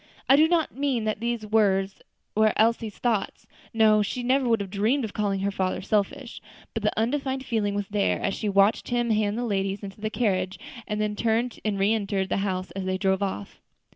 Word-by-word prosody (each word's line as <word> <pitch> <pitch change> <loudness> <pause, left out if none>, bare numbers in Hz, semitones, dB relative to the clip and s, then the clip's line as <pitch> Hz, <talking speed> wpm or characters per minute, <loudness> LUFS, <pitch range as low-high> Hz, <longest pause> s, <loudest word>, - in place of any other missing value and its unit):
I 270 - +7
do 310 +3 +5
not 330 -2 +1
mean 270 -4 0
that 215 -1 -1
these 235 -1 -2
were 205 -3 +3 0.5
Elsie's 220 0 +2
thoughts; 225 -5 -1 0.3
no, 215 -1 +4
she 245 +4 -3
never 260 0 +2
would 225 -1 +3
have 195 -2 -5
dreamed 225 +6 +1
of 210 - -8
calling 200 -2 -1
her 200 +1 0
father 185 -1 -1
selfish; 215 +5 -2 0.3
but 225 - -3
the 210 +1 0
undefined 265 +2 -1
feeling 210 -4 -1
was 205 -1 -2
there, 205 -1 +1
as 195 - -1
she 210 - -2
watched 200 +2 +3
him 240 -1 +1
hand 210 0 +1
the 245 - -1
ladies 195 -2 -1
into 200 +1 -9
the 215 - -1
carriage, 190 -5 -1 0.3
and 210 0 -2
then 210 0 -1
turn 230 +3 +1
and 210 -2 -1
reenter 200 -1 +1
the - - -1
house 190 -2 -2
as 195 -1 -5
they 185 0 -1
drove 190 0 +1
off. 145 - -4
215 Hz, 200 wpm, -26 LUFS, 195-230 Hz, 0.5 s, I